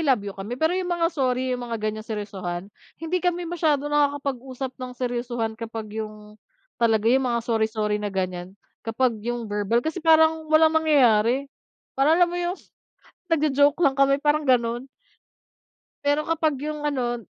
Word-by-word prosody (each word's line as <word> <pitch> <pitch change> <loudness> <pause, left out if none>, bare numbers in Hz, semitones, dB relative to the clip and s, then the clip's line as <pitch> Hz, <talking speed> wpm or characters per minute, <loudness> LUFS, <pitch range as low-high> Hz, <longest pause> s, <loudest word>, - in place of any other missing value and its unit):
love 265 -9 +2
you 200 - -5
kami, 205 +6 -6
pero 315 +4 +1
yung 365 0 -2
mga 345 -1 +1
sorry 255 -3 0
yung 250 - -3
mga 235 -1 -4
ganyang 215 0 -4
seryosohan, 200 -3 -5 0.2
hindi 340 +2 -2
kami 355 0 0
masyadong 300 -4 0
nakakapag-usap 275 -3 -1
ng 255 0 -5
seryosohan 240 -2 -2
kapag 225 -2 -6
yung 215 -1 -9 0.4
talaga 225 -2 +3
yung 260 -1 +2
mga 235 - +1
sorry-sorry 220 -2 0
na 205 - -2
ganyan, 185 -1 -4 0.2
kapag 235 +2 0
yung 240 +1 -3
verbal 210 +3 0
kasi 320 +3 -3
parang 320 -1 +4
walang 315 0 +5
mangyayari, 275 -4 +3 0.4
parang 290 +4 +3
alam 350 0 +3
mo - - -3
yung, 350 +2 -2 0.7
nagjo-joke 290 0 +2
lang 275 -2 +3
kami 275 +1 +3
parang 295 0 +2
ganun. 240 -1 +1 1.2
Pero 290 +1 +2
kapag 320 -2 +1
yung 300 -1 -4
ano. 240 -5 -1
255 Hz, 155 wpm, -24 LUFS, 220-305 Hz, 1.2 s, walang